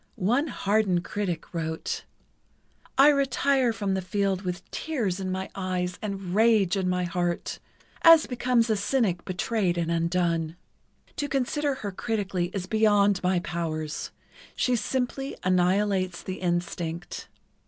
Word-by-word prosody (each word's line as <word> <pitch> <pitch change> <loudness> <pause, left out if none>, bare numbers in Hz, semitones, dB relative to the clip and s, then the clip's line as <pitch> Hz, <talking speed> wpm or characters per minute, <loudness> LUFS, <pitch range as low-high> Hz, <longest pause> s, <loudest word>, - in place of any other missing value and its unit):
One 245 - +1
hardened 200 - +1
critic 185 -6 -4
wrote: 160 -1 -3 0.9
I 275 +2 +8
retire 275 -2 +2
from 205 -3 -2
the 190 - 0
field 195 0 0
with 180 0 -5
tears 230 - -2
in 190 -1 -3
my 190 +1 -4
eyes 180 -1 -2
and 195 -4 -4
rage 215 -4 +4
in 190 -2 0
my 180 0 0
heart, 175 -1 -2 0.4
as 330 -2 +8
becomes 245 -2 +1
a - - +3
cynic 205 -4 0
betrayed 185 -1 0
and 170 -1 0
undone. 170 -1 0 0.6
To 290 - -1
consider 275 +2 0
her 200 - -2
critically 195 -4 -2
is 195 -3 -3
beyond 205 -2 +3
my 180 -1 +1
powers—she 165 - -3
simply 260 +3 -2
annihilates 185 0 +1
the 185 0 -5
instinct. 175 -1 -3
190 Hz, 130 wpm, -27 LUFS, 175-225 Hz, 0.9 s, I